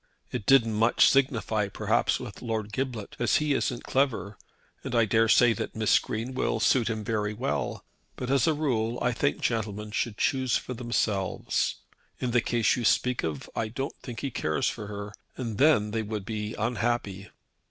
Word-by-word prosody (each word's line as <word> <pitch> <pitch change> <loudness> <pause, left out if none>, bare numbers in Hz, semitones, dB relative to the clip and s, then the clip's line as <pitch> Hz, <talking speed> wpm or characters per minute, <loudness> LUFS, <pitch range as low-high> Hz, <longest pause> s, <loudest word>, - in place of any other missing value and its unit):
It 120 -5 -4
didn't 120 -5 +5
much 115 +3 +4
signify, 115 -6 +2
perhaps, 100 - +1
with - - -8
Lord 110 -3 -3
Giblet, 125 -5 -3
as 120 -2 +2
he 150 -1 +2
isn't 125 -2 -1
clever, 115 -7 0 0.5
and - - -3
I 115 -1 +5
daresay 115 +2 +4
that - - -5
Miss 110 -1 +4
Green 115 +4 -4
will 120 -3 0
suit 115 0 +3
him 110 -1 -3
very 105 -1 -1
well; 125 +5 -2 0.3
but 125 +1 -4
as 135 -3 +3
a 160 - +3
rule 120 -6 0
I 125 - +1
think 145 +5 0
gentlemen 105 -5 -2
should 110 0 -2
choose 130 -2 +1
for 125 - -6
themselves. 115 -5 -1 0.4
In 125 - -1
the 120 0 +3
case 115 -2 +2
you 125 - -3
speak 125 +2 +2
of 75 -4 -3
I 110 - -1
don't 135 +5 -4
think 120 -3 -7
he 140 - -3
cares 80 -8 0
for 105 -3 -4
her, 100 0 -6 0.2
and 115 -5 -4
then 130 -8 +4
they 110 +1 -1
would 105 -2 -4
be 105 0 -4
unhappy." 110 -3 -2
115 Hz, 180 wpm, -27 LUFS, 105-125 Hz, 0.5 s, didn't